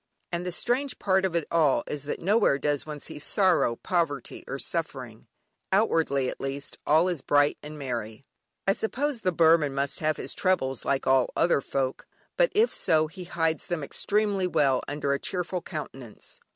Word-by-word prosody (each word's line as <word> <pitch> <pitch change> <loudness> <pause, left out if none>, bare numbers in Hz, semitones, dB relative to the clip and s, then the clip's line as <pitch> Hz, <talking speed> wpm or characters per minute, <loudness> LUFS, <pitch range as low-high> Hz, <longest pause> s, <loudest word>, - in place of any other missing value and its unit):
And 170 0 -2
the - - -1
strange 250 +9 -1
part 190 -1 +2
of 180 -3 -2
it 165 -3 +1
all 150 -7 +3
is 145 -1 -5
that 145 - -3
nowhere 200 -5 +3
does 145 +1 -1
one 150 -1 -6
see 145 - -7
sorrow, 185 - +2
poverty, 155 -4 -2
or - - -4
suffering; - - -4 0.4
outwardly 165 - +2
at - - -5
least, 135 +1 -5
all 160 +4 +5
is 175 -6 -2
bright 145 +1 +2
and 150 0 -9
happy. 120 -2 -5 0.4
I 195 - +5
suppose 255 +4 -2
the 185 - +1
Burman 160 -4 +4
must 140 0 -1
have 155 0 0
his - - -4
troubles 135 -9 0
like 140 -1 0
other 135 +4 +3
folk, 135 -1 -3 0.3
but - - +3
if 445 +3 +4
so 155 -1 +2
he 180 +3 -9
hides 165 -2 -1
them 175 -4 -2
extremely 200 +4 0
well 140 -7 +2
under 145 -1 -1
a 140 - -1
cheerful 180 +1 -2
countenance. 135 - -8
155 Hz, 175 wpm, -27 LUFS, 140-185 Hz, 0.4 s, all